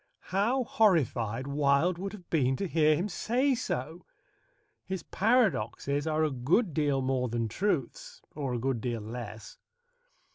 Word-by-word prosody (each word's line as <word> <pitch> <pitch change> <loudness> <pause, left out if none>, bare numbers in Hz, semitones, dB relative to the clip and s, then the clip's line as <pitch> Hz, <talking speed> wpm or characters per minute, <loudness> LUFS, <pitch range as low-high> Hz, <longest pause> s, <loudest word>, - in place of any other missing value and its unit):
How 235 +7 +2
horrified 130 - +1
Wilde 140 +5 +2
would 195 +2 -4
have 185 -5 -11
been 135 -5 +2
to 195 - -2
hear 155 -2 +3
him 175 +7 -1
say 250 +8 +1
so! 170 - -4 0.8
His 190 -3 -5
paradoxes 160 - +1
are 155 0 +1
a 155 - +1
good 150 - +1
deal 145 -3 +1
more 130 -1 0
than 115 0 -1
truths 145 - -2
or 135 -4 -3
a - - -2
good 130 -1 -1
deal 120 -2 -2
less. 110 -1 -8
150 Hz, 145 wpm, -29 LUFS, 125-190 Hz, 0.8 s, hear